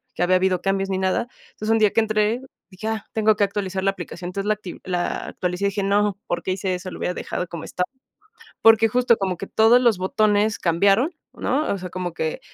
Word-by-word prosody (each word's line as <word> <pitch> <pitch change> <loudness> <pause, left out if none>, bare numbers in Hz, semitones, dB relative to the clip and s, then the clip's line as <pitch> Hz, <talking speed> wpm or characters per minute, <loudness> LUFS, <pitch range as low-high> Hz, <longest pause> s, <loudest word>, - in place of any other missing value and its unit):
que - - 0
había 185 +1 +3
habido 185 -1 +1
cambios 195 0 0
ni 190 - 0
nada, 190 +4 0 0.2
entonces, 215 - -6
un 225 - +4
día 210 -2 +4
que 225 - +4
entré, 215 +2 +1 0.3
dije: 200 +3 -7
"Ah, 220 -2 -2
tengo 215 -1 +3
que 205 - +4
actualizar 195 -1 -3
la 195 - +3
aplicación", 175 -2 -8
entonces, 195 +2 -4
la 215 - +4
acti 195 -4 -9
la 180 -1 -2
actualicé 180 +2 -3
y - - +4
dije: 200 0 -2
"No, 200 0 +1
¿por 175 0 -2
qué 185 - -2
hice 185 0 -2
eso?, 185 +1 -7
lo - - -8
hubiera 180 - -1
dejado 180 - -4
como 170 -1 -7
estaba", 180 - -2 0.8
porque 225 0 +6
justo 245 0 +3
como 190 -2 -1
que 195 - -6
todos 230 +3 +5
los 235 -5 +3
botones 210 +3 +2
cambiaron, 195 - +3 0.2
¿no?, 290 +4 -1
o - - -2
sea, 180 - -6
como 180 -1 -4
que 160 -2 -3
195 Hz, 230 wpm, -23 LUFS, 185-215 Hz, 0.8 s, porque